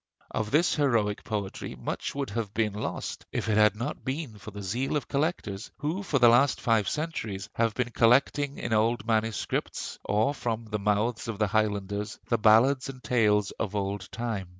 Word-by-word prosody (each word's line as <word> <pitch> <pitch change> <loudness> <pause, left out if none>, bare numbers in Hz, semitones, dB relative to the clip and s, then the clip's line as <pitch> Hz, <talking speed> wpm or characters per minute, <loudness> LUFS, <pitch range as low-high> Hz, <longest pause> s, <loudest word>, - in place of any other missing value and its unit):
Of 110 -2 -2
this 155 +7 +3
heroic 115 -8 +1
poetry 100 -3 -4
much - - -4
would 140 -5 -3
have 105 -1 -3
been 110 -2 +1
lost 105 - -4
if - - -2
it 110 - +2
had 105 0 +5
not 125 +8 -4
been 130 -5 -4
for 110 - -9
the 105 -1 -8
zeal 125 +10 -1
of 145 - -5
collectors, 140 - -2
who 155 +7 -2
for 165 -8 0
the 120 -2 +6
last 125 +4 +5
five 110 -4 +2
centuries 115 -11 -3
have 115 -2 +1
been 125 -1 -1
collecting 135 +5 +3
in 115 - -2
old 110 +2 +2
MSS. 110 -1 -1
or 110 +7 +1
from 115 -4 -3
the 105 -1 -3
mouths 105 +4 0
of 115 -3 -3
the 110 - +2
Highlanders 105 0 -1
the 115 - +2
ballads 125 +6 +5
and 130 -1 -9
tales 105 -5 +2
of 105 -1 -2
old 100 -1 -3
time. 110 -6 -3
110 Hz, 185 wpm, -28 LUFS, 105-130 Hz, -, the